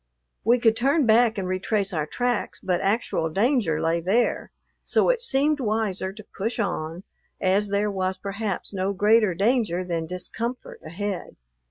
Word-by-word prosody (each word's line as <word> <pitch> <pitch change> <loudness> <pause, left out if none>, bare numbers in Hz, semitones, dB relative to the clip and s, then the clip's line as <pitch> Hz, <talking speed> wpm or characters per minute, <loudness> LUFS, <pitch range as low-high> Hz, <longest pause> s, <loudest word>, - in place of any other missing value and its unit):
We 235 +3 +4
could 225 -1 +4
turn 275 +5 +2
back 225 0 +4
and 190 -2 -2
retrace 195 +2 -1
our 155 -2 -1
tracks, 245 +4 -1
but 180 -2 -1
actual 195 -5 0
danger 200 - +1
lay 165 +1 0
there; 205 +8 +1 0.3
so - - +2
it - - +2
seemed 295 - +2
wiser 215 -5 -1
to 210 +1 -12
push 225 +5 -2
on, 175 -4 -3 0.4
as 200 +2 +2
there 205 +1 0
was, 190 -1 -2
perhaps, 200 +1 -4
no 195 +1 -1
greater 210 -1 +3
danger 205 -3 +1
than 170 -2 -3
discomfort 225 +8 -4
ahead. 185 +3 -5
200 Hz, 155 wpm, -24 LUFS, 185-230 Hz, 0.4 s, We